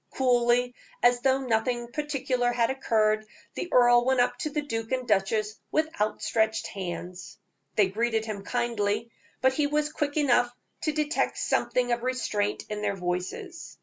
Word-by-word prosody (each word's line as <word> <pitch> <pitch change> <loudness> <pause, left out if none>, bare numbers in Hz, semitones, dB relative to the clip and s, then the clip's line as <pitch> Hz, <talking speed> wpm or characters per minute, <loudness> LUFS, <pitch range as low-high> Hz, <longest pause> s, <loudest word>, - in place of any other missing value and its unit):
Coolly, 245 -1 +2 0.3
as 245 0 +4
though 265 +1 +3
nothing 240 0 -1
particular 265 -4 -1
had 235 0 +1
occurred, 215 -5 +1 0.3
the 355 - -4
earl 240 -1 +6
went 260 0 +2
up 245 0 +3
to 305 - -2
the 300 0 -2
duke 225 -5 -4
and 255 -1 -1
duchess 210 +1 +1
with 315 +1 +2
outstretched 220 +1 0
hands. 180 -1 -6 0.4
They 205 -3 +4
greeted 225 +2 0
him 210 -3 -5
kindly, 230 -1 -1 0.3
but 260 0 +4
he 290 +1 +1
was 300 +1 0
quick 290 0 -2
enough 245 -4 +3 0.3
to 310 - +2
detect 300 +1 0
something 245 -1 0
of 240 0 0
restraint 235 -5 -1
in 210 0 -4
their 200 -1 0
voices. 185 - -5
240 Hz, 155 wpm, -27 LUFS, 215-260 Hz, 0.4 s, earl